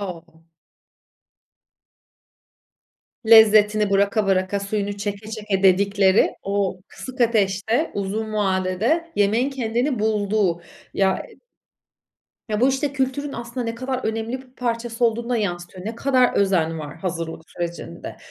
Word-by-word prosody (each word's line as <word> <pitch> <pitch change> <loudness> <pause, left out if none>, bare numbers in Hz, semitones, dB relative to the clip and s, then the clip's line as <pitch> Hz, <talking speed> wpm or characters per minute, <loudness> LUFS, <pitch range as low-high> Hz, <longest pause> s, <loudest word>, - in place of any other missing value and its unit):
O! 165 -4 -8 2.8
Lezzetini 215 -2 +6
bıraka 200 +1 +2
bıraka, 190 +1 +1
suyunu 200 0 -3
çeke 205 +1 -5
çeke 210 -3 -2
dedikleri, 195 +1 +4
o 195 -2 -1
kısık 260 0 -10
ateşte, 220 - +1
uzun 215 +2 -3
vadede, 205 - 0
yemeğin 220 +6 +2
kendini 245 0 -1
bulduğu. 210 -4 0 0.3
Ya 190 -1 +1 1.2
Ya, 210 0 -1
bu, 255 - +5
işte, 270 +1 -1
kültürün 275 +1 -2
aslında 235 +1 -5
ne 230 0 -3
kadar 255 +2 -3
önemli 225 +3 -3
bir 255 0 -24
parçası 235 -1 -2
olduğunu 235 +1 0
da 245 - +1
yansıtıyor. 180 -1 -4
Ne 225 - -4
kadar 255 +1 +2
özen 170 -5 +1
var 150 0 -8
hazırlık 165 -2 -4
sürecinde. 170 - -6
210 Hz, 120 wpm, -22 LUFS, 190-235 Hz, 2.8 s, Lezzetini